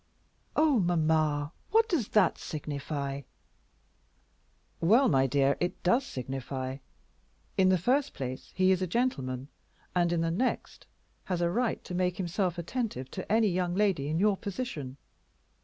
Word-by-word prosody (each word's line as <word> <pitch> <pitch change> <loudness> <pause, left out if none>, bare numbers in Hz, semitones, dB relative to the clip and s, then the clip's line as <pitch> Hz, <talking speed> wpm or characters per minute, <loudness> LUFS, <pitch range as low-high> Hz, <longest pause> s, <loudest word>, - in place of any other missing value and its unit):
"Oh, 300 -5 +4
mamma, 155 -4 +1 0.2
what 450 +1 +4
does 310 - 0
that 205 -5 +3
signify?" 140 -2 -4 1.6
"Well, 225 +11 +5
my 135 -2 +3
dear, 140 +1 +2
it 175 +1 -2
does 235 +9 +3
signify. 130 0 -4 0.8
In 190 -1 +4
the 185 - +4
first 260 - +1
place, 130 -1 -5
he 185 0 +4
is 190 -1 +2
a 185 - 0
gentleman, 135 - -1 0.5
and 175 -1 +3
in 170 -1 +1
the 165 0 0
next, 245 +10 -2 0.4
has 180 -2 -1
a 170 0 +1
right 240 +4 0
to - - -7
make 180 0 0
himself 180 -1 -1
attentive 170 - -3
to 185 - -6
any 220 -1 +4
young 180 -1 0
lady 190 -9 +1
in 155 +2 0
your 200 +2 +3
position. 180 - -5
175 Hz, 145 wpm, -29 LUFS, 145-205 Hz, 1.6 s, Well